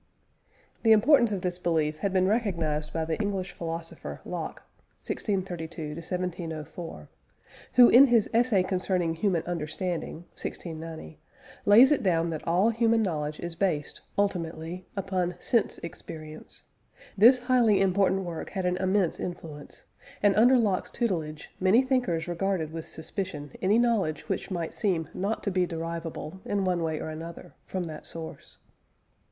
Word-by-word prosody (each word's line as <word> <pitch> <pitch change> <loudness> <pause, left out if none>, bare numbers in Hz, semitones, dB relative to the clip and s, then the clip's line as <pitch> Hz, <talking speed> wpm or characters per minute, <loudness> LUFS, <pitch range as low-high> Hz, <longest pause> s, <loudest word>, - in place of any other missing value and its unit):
The 225 -1 +6
importance 235 +1 +5
of 195 -3 -2
this 180 0 -2
belief 155 -3 0
had 200 +4 0
been 185 -1 +3
recognised 170 -9 0
by 160 -1 -1
the 160 +5 -2
English 195 -3 -2
philosopher, 165 -1 -6
Locke - - -5 0.4
(1632 175 -6 -3
1704), 165 - -5 0.7
who 245 -1 +9
in 265 +4 +8
his 235 -4 +4
Essay 230 -5 +3
concerning 185 -2 0
Human 170 -1 0
Understanding 170 0 -4
(1690), 160 - -7 0.5
lays 235 +8 +8
it 295 - +3
down 170 -5 +1
that 155 - -6
all 185 +7 +3
human 230 0 +3
knowledge 150 -5 -2
is 170 0 -5
based, 165 -5 -1 0.2
ultimately, 175 -2 -2
upon 185 -2 -1
sense 235 -4 +1
experience. 155 -2 -9 0.5
This 235 +6 +7
highly 245 -4 +3
important 195 0 +2
work 170 -3 -5
had 190 -3 -3
an 180 0 +1
immense 190 -1 +1
influence, 160 -4 -7 0.4
and, 205 -1 +5
under 245 +4 +6
Locke's 205 -6 +1
tutelage, 160 -10 -3
many 195 +7 +5
thinkers 245 -12 0
regarded 175 -2 -1
with 165 -1 -5
suspicion 155 -4 -4
any 200 +4 +3
knowledge 225 -10 +1
which - - -2
might 170 -4 -3
seem 170 -8 0
not 200 +4 -2
to 200 - -1
be 180 -1 +1
derivable, 165 +1 -5
in 200 -1 -1
one 180 -2 +1
way 160 -2 -1
or - - -4
another, 165 +2 -8
from 185 -1 -2
that 155 -3 -7
source. 165 -1 -8
180 Hz, 145 wpm, -28 LUFS, 165-200 Hz, 0.7 s, who